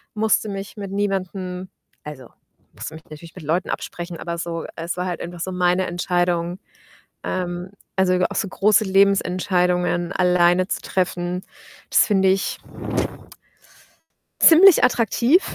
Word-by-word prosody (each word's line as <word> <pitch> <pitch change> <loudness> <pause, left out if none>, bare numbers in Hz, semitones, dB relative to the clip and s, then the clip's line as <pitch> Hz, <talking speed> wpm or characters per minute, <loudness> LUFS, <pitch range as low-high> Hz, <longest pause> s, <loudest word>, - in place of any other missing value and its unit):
musste 215 0 +1
mich 195 +2 -7
mit 200 -1 -6
niemandem 190 -2 -3 0.3
also 140 -5 -9 0.4
musste 160 - -7
mich 160 - -12
natürlich 155 +2 -12
mit 180 - -10
Leuten 165 +5 -1
absprechen, 175 0 -5
aber 170 +1 -5
so 165 -1 -4
es 165 +2 -4
war 180 - -2
halt 180 -1 -4
einfach 175 0 -7
so 185 - -3
meine 180 0 +1
Entscheidung. 175 0 -1 0.7
Ähm, 180 +1 -4 0.2
also 190 -1 +2 0.2
auch - - -5
so 200 - 0
große 210 +2 +3
Lebensentscheidungen 180 -2 +1
alleine 180 0 +3
zu - - -3
treffen, 180 -1 -2 0.5
das - - +5
finde 195 -3 +3
ich 190 +1 0 1.8
ziemlich 350 +2 +8
attraktiv 245 - +3
180 Hz, 130 wpm, -21 LUFS, 175-195 Hz, 1.8 s, ziemlich